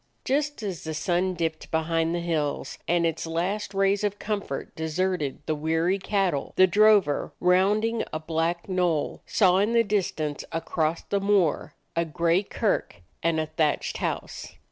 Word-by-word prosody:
Just 290 -2 0
as 190 -5 -4
the 160 0 -4
sun 180 +3 0
dipped 160 -2 -3
behind 165 +1 0
the 175 - -2
hills 160 -4 -2
and 170 0 +2
its 165 0 -2
last 185 +6 -2
rays 195 +1 +2
of 205 0 -1
comfort 205 -11 -4
deserted 160 -2 -2
the 155 - 0
weary 165 +5 0
cattle, 190 -7 -1
the 185 - +7
drover, 205 -4 +3
rounding 205 +6 +2
a - - -2
black 165 +2 -1
knoll, 180 -5 0
saw 185 -3 +4
in 210 +4 +1
the 230 0 +5
distance 175 -8 -1
across 165 0 -1
the 200 - -1
moor 195 -6 +1 0.2
a 170 - +2
gray 170 +2 +1
kirk 140 - -2 0.2
and 165 -1 +1
a 155 - 0
thatched 155 -1 -1
house. - - -4
175 Hz, 155 wpm, -26 LUFS, 160-195 Hz, 0.2 s, the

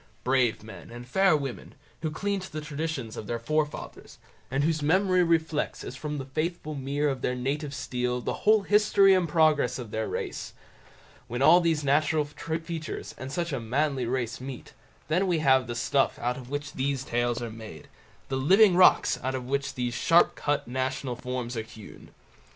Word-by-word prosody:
Brave 125 -4 +1
men 110 - -11
and 120 +1 -10
fair 190 +4 +4
women, 135 -4 -6 0.3
who 160 - -1
cling 200 +6 -2
to 185 - -9
the 155 - -4
traditions 150 -6 -4
of 105 - -7
their 120 - -2
forefathers, 150 +5 -3 0.3
and 135 +2 0
whose 155 0 +1
memory 185 +4 +3
reflects 160 -3 0
as 125 - -7
from 150 +2 -4
the 135 - -5
faithful 155 +3 -3
mirror 140 +1 -1
of 130 -2 -5
their 125 - -1
native 140 +4 -2
steel 125 -3 -2
the - - -3
whole 215 -1 +4
history 205 -1 +5
and 180 -3 +2
progress 150 -6 +3
of 120 -5 -8
their 110 0 -2
race—when 120 +3 -7
all 175 +5 +7
these 165 -3 +1
natural 150 +2 +2
features, 160 +1 -5
and 130 +1 -6
such 170 0 -2
a 135 - -1
manly 130 +2 -1
race 125 0 -2
meet; 130 -1 -8 0.3
then 180 +6 +1
we 175 -2 +2
have 130 -5 +3
the 120 - -4
stuff 135 +3 +1
out 125 +1 -1
of 125 -1 -10
which 145 +1 -4
these 135 0 -1
tales 120 -1 -1
are 120 -2 -5
made, 110 -8 -10 0.4
the 135 - -2
living 190 +8 +5
rocks 180 0 +5
out 130 +1 -2
of 130 -1 -4
which 140 +2 -2
these 125 -1 -2
sharp 165 +8 +4
cut 145 -1 -1
national 130 0 -2
forms 125 0 -4
are 115 - -1
hewn. 110 -1 -13
140 Hz, 185 wpm, -27 LUFS, 125-160 Hz, 0.4 s, all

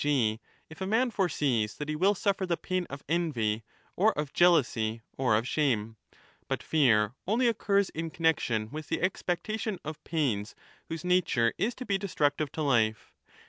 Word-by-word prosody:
g. 120 -7 +1 0.3
if 160 - -13
a 190 - -1
man 235 +4 +2
foresees 140 - 0
that 150 - -5
he 155 - -2
will 195 +6 +3
suffer 195 0 0
the 170 -1 0
pain 185 -1 -2
of 140 0 -8
envy 125 -10 0 0.3
or 215 +4 +4
of 150 -2 -3
jealousy 120 -10 +3
or 125 -5 +2
of 115 +3 -2
shame. 115 -7 0 0.5
But - - -2
fear 115 -8 +3
only 235 +5 +2
occurs 200 -4 +1
in 165 +1 -4
40 - - -17
connexion 120 -10 +1
with 155 0 -6
the - - 0
expectation 195 +3 -1
of 155 0 -6
pains 125 -10 -1 0.3
whose 165 +1 -5
nature 165 -10 +2
Js^to 245 +4 -1
1229^ - - -22
be 200 - +2
destructive 150 -6 0
to 160 - -3
life. 110 -6 +1
155 Hz, 175 wpm, -29 LUFS, 120-185 Hz, 0.5 s, or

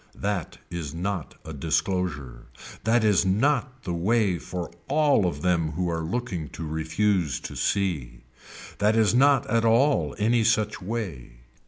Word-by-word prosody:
That 100 -4 -3
is 80 -3 -5
not 90 -1 -3
a 80 - -7
disclosure. 75 -4 -2 0.4
That 115 +1 +3
is 105 -5 +4
not 130 +6 0
the 90 - -3
way 95 +1 +1
for 85 +6 -6 0.2
all 140 -8 +3
of 75 -4 -4
them 85 -4 +1
who 90 +2 -1
are 80 0 -2
looking 90 - -3
to 80 - -5
refuse 80 0 0
to - - -7
see. 80 -12 -1 0.6
That 105 +2 +3
is 110 -1 +3
not 140 +1 +4
at 115 -3 +1
all 115 - +3
any 115 +2 +2
such 105 -1 +1
way. 90 - -5
95 Hz, 150 wpm, -25 LUFS, 80-115 Hz, 0.6 s, is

